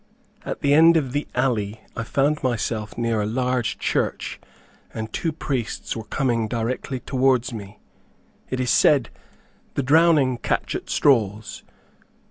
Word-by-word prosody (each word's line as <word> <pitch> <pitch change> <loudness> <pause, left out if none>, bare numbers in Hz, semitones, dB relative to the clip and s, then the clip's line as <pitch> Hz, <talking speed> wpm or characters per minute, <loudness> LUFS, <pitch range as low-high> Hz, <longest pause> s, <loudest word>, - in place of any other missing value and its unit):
At - - -5
the 140 - +3
end 165 +2 +7
of 135 -5 -1
the 145 +3 -2
alley, 115 -5 0 0.2
I 115 - -3
found 140 +6 0
myself 115 -4 -2
near 115 -2 0
a 105 - -1
large 125 +1 -1
church, - - -2 0.6
and 110 0 -5
two 165 - -1
priests 135 -6 -3
were 110 -2 -6
coming 120 -2 0
directly 120 +3 -3
towards 130 -2 +1
me. 105 -2 -8 0.7
It 130 - -2
is 125 -1 +1
said 140 -6 +4 0.6
"the 140 - 0
drowning 145 -3 +4
catch - - -1
at - - -5
straws." 110 -5 +1
125 Hz, 140 wpm, -23 LUFS, 110-140 Hz, 0.7 s, end